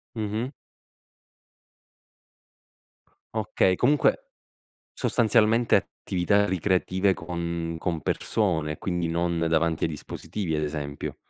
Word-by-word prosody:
Mh-mh. 110 +3 -2 2.9
Okay, 100 -3 +2
comunque 150 - +2 0.6
sostanzialmente 115 0 +3
attività 100 +3 0
ricreative, 95 +1 +1
con 85 -1 -4
con 85 -2 -2
persone 80 -4 0
quindi 90 -2 -2
non 85 +1 0
davanti 80 0 +2
ai - - -1
dispositivi 80 +4 -5
ad 75 0 0
esempio. 75 -1 -4
90 Hz, 85 wpm, -26 LUFS, 80-105 Hz, 2.9 s, sostanzialmente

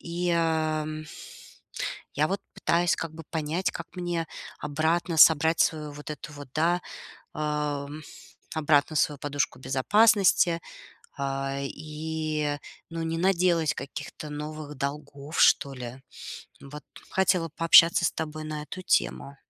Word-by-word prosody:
И, 175 +1 -2
ам, 155 -2 0 1.1
я 150 +2 +2
вот 195 +1 -2
пытаюсь 175 +1 +2
как 165 -1 -5
бы 165 - -9
понять, 160 +3 -1
как - - -7
мне 175 -2 -2 0.3
обратно 160 +3 0
собрать 160 +1 +6
свою 150 -2 +1
вот 150 +1 -9
эту 150 0 -7
вот, 145 -1 -10
да, 170 +3 +2 0.5
ам, 150 -1 -2 0.5
обратно 150 0 +2
свою 145 0 +2
подушку 145 -3 -2
безопасности. 175 - +4 0.6
А, 135 0 -2
и, 155 +1 -3 0.3
ну, 165 0 -4
не 165 0 -2
наделать 170 -3 +2
каких-то 145 +2 -7
новых 150 0 -6
долгов, 140 +2 -5
что 140 -5 +5
ли. 125 +1 -8 0.6
Вот. 145 +2 -10 0.3
Хотела 185 -3 +2
пообщаться 165 +1 +7
с - - 0
тобой 155 0 -5
на 155 -1 -4
эту 150 +5 -8
тему. 140 -5 0
155 Hz, 125 wpm, -27 LUFS, 145-165 Hz, 1.1 s, пообщаться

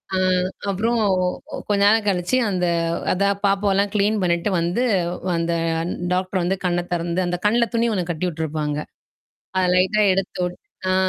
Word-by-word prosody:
அ - - +1 0.5
அப்புறம் 225 +5 0 0.5
கொ - - -6
கொஞ்சம் 200 -1 +2
நேரம் 220 0 +4
கழிச்சு 185 +6 +1
அந்த 180 -2 0 0.5
அதான் 200 +1 +1
பாப்பாவெல்லாம் 200 0 +2
கிளீன் 210 +1 +2
பண்ணிட்டு 170 +3 +1
வந்து 175 +9 0 0.5
அந்த 170 0 0 0.6
டாக்டர் 185 0 -1
வந்து 190 +2 0
கண்ண 175 0 +1
திறந்து 175 +2 -1
அந்த 175 0 -2
கண்ணல 235 +2 +3
துணி 235 +1 +2
ஒன்னு 180 -3 -2
கட்டி 175 +2 -2
விட்டுருப்பாங்க. 150 -2 -3 0.8
அத 185 - +3
லைட்டா 190 +4 +3
எடுத்து 185 -1 -3
விட்டு 180 - -8 0.3
ஆ - - +2
185 Hz, 150 wpm, -22 LUFS, 175-205 Hz, 0.8 s, நேரம்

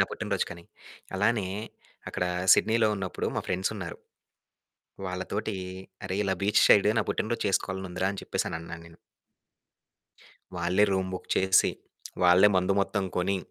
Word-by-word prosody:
నా - - +6
పుట్టినరోజుకని. 85 0 -3 0.5
అలానే 105 -1 +1 0.6
అక్కడ 90 - -2 0.3
'సిడ్నీలో' 110 0 +3
ఉన్నప్పుడు 95 -2 -3
మా - - +1
ఫ్రెండ్సున్నారు. 95 -1 -3 1.1
వాళ్ళతోటి, 95 +3 -3 0.5
"అరె! 95 - -3
ఇలా 95 -1 +1
బీచ్ 105 +1 +3
సైడు 105 +1 +6
నా - - +3
పుట్టినరోజు 115 +2 -2
చేసుకోవాలనుందిరా" 95 -1 -1
అని 100 - -6
చెప్పేసని - - -2
అన్నాను 85 0 -9
నేను. 85 0 -16 1.6
వాళ్ళే 90 +4 +2
రూమ్ 95 -1 0
బుక్ 90 - -6
చేసి, 95 0 +4 0.5
వాళ్ళే 90 +3 +7
మందు 95 +1 +2
మొత్తం 100 0 -1
కొని, 95 +2 +1
95 Hz, 125 wpm, -28 LUFS, 90-100 Hz, 1.6 s, వాళ్ళే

